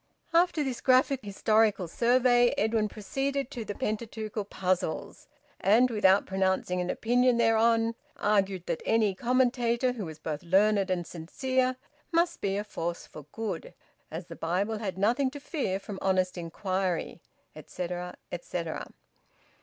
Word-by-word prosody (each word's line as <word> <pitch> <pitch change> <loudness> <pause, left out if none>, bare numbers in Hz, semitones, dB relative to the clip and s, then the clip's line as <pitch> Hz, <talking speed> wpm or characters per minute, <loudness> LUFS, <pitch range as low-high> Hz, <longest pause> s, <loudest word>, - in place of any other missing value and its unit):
After 335 -2 +3
this 260 -3 -3
graphic 260 0 +3
historical 210 -1 +2
survey, 245 +4 +3
Edwin 220 0 +1
proceeded 275 +6 -3
to 235 - -5
the 205 -1 -5
Pentateuchal 215 -1 -3
puzzles, 185 -4 -2 0.3
and, 230 +6 +4
without 200 -3 +4
pronouncing 190 -1 0
an 180 - -3
opinion 245 +3 +2
thereon, 230 0 +3 0.2
argued 195 -3 +1
that 170 - -2
any 220 -3 +2
commentator 245 +2 +1
who 230 -6 -5
was 160 -2 -8
both 155 -1 -4
learned 195 +3 +3
and 180 -2 -1
sincere 255 - -1 0.4
must 340 +1 +1
be 195 0 0
a 205 - -1
force 170 -4 -4
for 150 -2 -12
good, 210 -7 -5 0.3
as 165 +3 -6
the 170 -1 -9
Bible 195 +6 -1
had 190 -4 -4
nothing 240 +7 +2
to 285 +2 -9
fear 270 - -2
from 200 -1 -7
honest 185 -1 +1
inquiry, 185 +1 -2 0.3
etcetera, 180 0 -5 0.2
etcetera. 170 -1 -4
210 Hz, 140 wpm, -29 LUFS, 185-245 Hz, 0.4 s, and